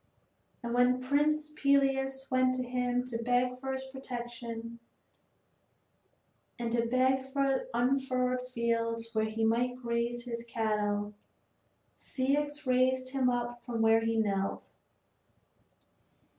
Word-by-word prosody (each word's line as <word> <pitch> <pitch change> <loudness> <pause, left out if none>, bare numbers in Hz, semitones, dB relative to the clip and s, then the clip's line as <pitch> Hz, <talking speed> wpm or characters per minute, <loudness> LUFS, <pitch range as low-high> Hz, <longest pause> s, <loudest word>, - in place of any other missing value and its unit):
And 235 0 -3
when 245 +1 +4
Prince 295 +3 +1
Peleus 270 -2 +2
went 255 0 +3
to 255 - -1
him 250 0 0
to 235 -2 -4
beg 250 +1 +1
for 265 0 -3
his 265 0 -1
protection, 240 -3 -6 1.8
and 235 -1 -3
to 235 0 +1
beg 260 +2 +2
for 270 -1 0
unfurrowed 255 0 +1
fields 230 -1 -1
where 220 -1 +2
he 220 +1 -2
might 245 +3 +1
graze 240 -1 -2
his 235 -1 -5
cattle, 210 -3 -1 0.9
Ceyx 290 +3 -1
raised 255 0 +2
him 260 -2 +2
up 240 0 -2
from 230 -2 -1
where 225 0 +5
he 225 0 0
knelt. 195 -3 -1
250 Hz, 115 wpm, -31 LUFS, 230-260 Hz, 1.8 s, where